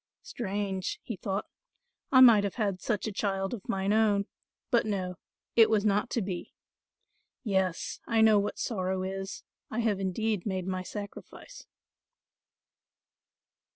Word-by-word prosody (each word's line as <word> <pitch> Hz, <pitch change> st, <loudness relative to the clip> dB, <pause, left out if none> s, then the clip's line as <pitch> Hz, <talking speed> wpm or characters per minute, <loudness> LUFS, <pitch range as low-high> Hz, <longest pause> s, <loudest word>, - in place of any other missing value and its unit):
"Strange," 195 Hz, -4 st, -3 dB
he 230 Hz, -, -5 dB
thought, 195 Hz, +2 st, -3 dB, 0.7 s
"I 260 Hz, -, +7 dB
might 230 Hz, -5 st, +8 dB
have 200 Hz, -, -2 dB
had 200 Hz, -5 st, -1 dB
such 210 Hz, -4 st, -1 dB
a 220 Hz, -, -2 dB
child 195 Hz, 0 st, -1 dB
of 215 Hz, -6 st, -8 dB
mine 195 Hz, +1 st, +1 dB
own; 210 Hz, -2 st, +3 dB, 0.5 s
but 235 Hz, -, +4 dB
no, 185 Hz, -4 st, -3 dB, 0.4 s
it 225 Hz, -2 st, +7 dB
was 215 Hz, -1 st, +2 dB
not 205 Hz, 0 st, +2 dB
to 230 Hz, -, -1 dB
be. 185 Hz, -2 st, -5 dB, 0.9 s
Yes, 190 Hz, -5 st, -1 dB
I 225 Hz, -1 st, +3 dB
know 220 Hz, -2 st, +6 dB
what 200 Hz, -, -2 dB
sorrow 190 Hz, -4 st, -1 dB
is: 195 Hz, +1 st, -5 dB, 0.3 s
I 235 Hz, -, -1 dB
have 215 Hz, -4 st, +1 dB
indeed 200 Hz, +1 st, -1 dB
made 190 Hz, -3 st, -2 dB
my 185 Hz, 0 st, -2 dB
sacrifice. 205 Hz, -, -9 dB
200 Hz, 140 wpm, -29 LUFS, 190-220 Hz, 0.9 s, might